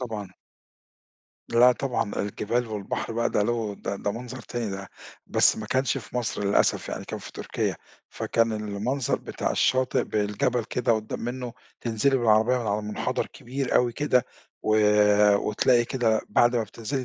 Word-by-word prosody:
طبعًا. 110 -6 -5 1.2
لا 120 +2 +6
طبعًا، 125 -5 -2
الجبال 110 +4 -1
والبحر 105 +1 -4
بقى 115 +1 0
ده 105 - +2
له 110 -2 -1
ده 100 - -4
ده 100 - -2
منظر 125 +2 -7
تاني 115 -3 -4
ده، 95 0 -6 0.4
بس - - +4
ما 110 - -5
كانش 130 +1 +1
في - - -8
مصر 115 -4 -2
للأسف 100 - +2
يعني، - - -5
كان - - -5
في - - -10
تركيا، - - -2 0.3
فكان 115 -1 0
المنظر 110 +5 -1
بتاع - - -3
الشاطئ 130 0 +2
بالجبل 105 +3 0
كده 120 +1 0
قدّام 110 -1 -3
منه، 125 0 -4 0.3
تنزِلي 120 +4 +1
بالعربية 115 +1 +3
من 115 - -4
على 105 +1 0
منحدر 105 0 -2
كبير 130 +2 -4
أوي 120 -1 +3
كده، 130 -2 +2 0.4
و 110 0 +2 0.6
وتلاقي 120 +4 +2
كده 115 -4 +1
بعد 120 +3 +3
ما 115 - +2
بتنزِلي 115 +5 -4
115 Hz, 160 wpm, -26 LUFS, 105-125 Hz, 1.2 s, لا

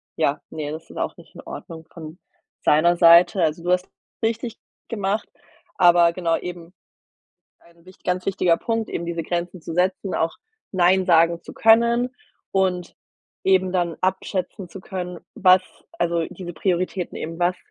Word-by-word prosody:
ja, 140 - +1
ne, 150 -2 -5
das 155 +1 -8
ist - - -13
auch - - -3
nicht - - -17
in - - -9
Ordnung 160 -1 -9
von 160 0 -10 0.4
seiner 170 +3 +4
Seite. 170 +2 +6
Also, 160 +1 0
du 180 - 0
hast 180 0 +1
es 225 - -4
richtig 230 0 -5 0.3
gemacht, 205 -1 -2 0.5
aber 175 -2 +5
genau 170 -2 0
eben 175 -1 -8 0.9
ein 170 0 -24
wich 185 0 -16
ganz 180 0 -1
wichtiger 185 -3 +2
Punkt, 225 -1 -2
eben 170 - -4
diese 170 -1 -3
Grenzen 175 +2 -3
zu 165 +1 -7
setzen, 185 +2 0
auch 165 0 -1 0.3
nein 185 0 +3
sagen 170 -1 +4
zu - - -10
können 235 +3 +4 0.4
und 185 -2 0 0.5
eben 190 -1 +3
dann 175 -3 0
abschätzen 185 0 -2
zu 195 - -10
können, 180 -2 -6
was 185 0 +5 0.4
also, 170 -1 +1
diese 175 -2 -8
Prioritäten 180 +1 -2
eben, 165 +1 -6
was 175 +1 +1
180 Hz, 160 wpm, -23 LUFS, 170-190 Hz, 0.9 s, Seite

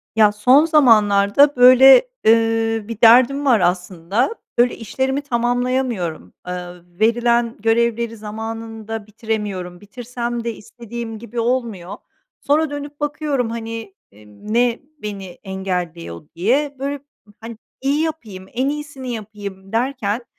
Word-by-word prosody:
Ya, 215 -2 +5
son 250 +9 +4
zamanlarda, 230 -3 +4
böyle, 260 - +7 0.2
ııı, 225 -1 +2
bir 230 -1 -7
derdim 255 +5 +6
var, 245 -5 +4
aslında. 180 - -1 0.2
Böyle, 245 +1 +3
işlerimi 265 +5 -2
tamamlayamıyorum. 245 - -2
Eee, 180 - -3 0.5
verilen 235 +1 +2
görevleri 230 +1 0
zamanında 225 0 -7
bitiremiyorum. 205 -5 -5
Bitirsem 240 +2 -5
de 235 0 -3
istediğim 230 0 -8
gibi 235 +1 -6
olmuyor. 230 -6 -2 0.5
Sonra 305 +2 +1
dönüp 290 0 -7
bakıyorum, 295 -4 -2
hani, 225 -2 -6 0.2
emm, 105 - -11
ne 240 0 +2 0.2
beni 205 -2 -6 0.2
engelliyor, 180 - -5
diye. 270 - 0
Böyle, 280 +1 -3 0.4
hani, 225 0 -8 0.2
iyi 280 +3 +1
yapayım, 230 -13 -5
en 260 +3 0
iyisini 290 -4 -6
yapayım, 200 -3 -8
derken, 235 -1 -1
230 Hz, 115 wpm, -19 LUFS, 210-255 Hz, 0.5 s, böyle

